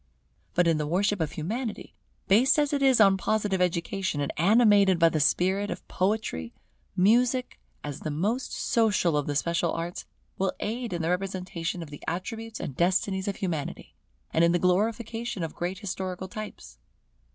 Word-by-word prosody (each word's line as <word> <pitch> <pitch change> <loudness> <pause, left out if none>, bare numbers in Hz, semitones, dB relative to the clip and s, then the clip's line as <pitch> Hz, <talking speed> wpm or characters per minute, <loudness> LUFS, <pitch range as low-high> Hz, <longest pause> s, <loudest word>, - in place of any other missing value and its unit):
But 175 -1 +3
in 165 -2 +2
the 150 - -1
worship 195 +3 +1
of 155 -2 -2
Humanity, 220 +8 -4 0.3
based 230 +10 +5
as 295 -1 +2
it 280 - 0
is 265 -3 +5
on 195 -2 +6
Positive 205 -2 0
education, 180 -1 -1
and 140 - -2
animated 200 0 +5
by 165 0 +5
the 160 - -1
spirit 190 +7 +2
of - - -6
Poetry, 185 - -2 0.4
Music, 245 +6 +2 0.2
as 145 -2 -5
the - - -4
most 205 - -1
social 205 -8 +1
of 145 -1 0
the 145 - -2
special 170 +3 +1
arts, 170 +1 -5 0.3
will 195 0 +1
aid 235 +2 -3
in 170 -2 -2
the 165 - 0
representation 180 -2 -3
of 150 - -11
the 145 - -9
attributes 220 +6 -4
and 135 - -5
destinies 190 +3 +1
of 200 - -1
Humanity, 165 -7 -4 0.4
and 165 - +3
in 170 0 +4
the - - +4
glorification 220 +3 0
of 160 - -4
great 180 +2 -3
historical 185 -2 -4
types. 215 +3 -9
190 Hz, 170 wpm, -27 LUFS, 170-215 Hz, 0.4 s, on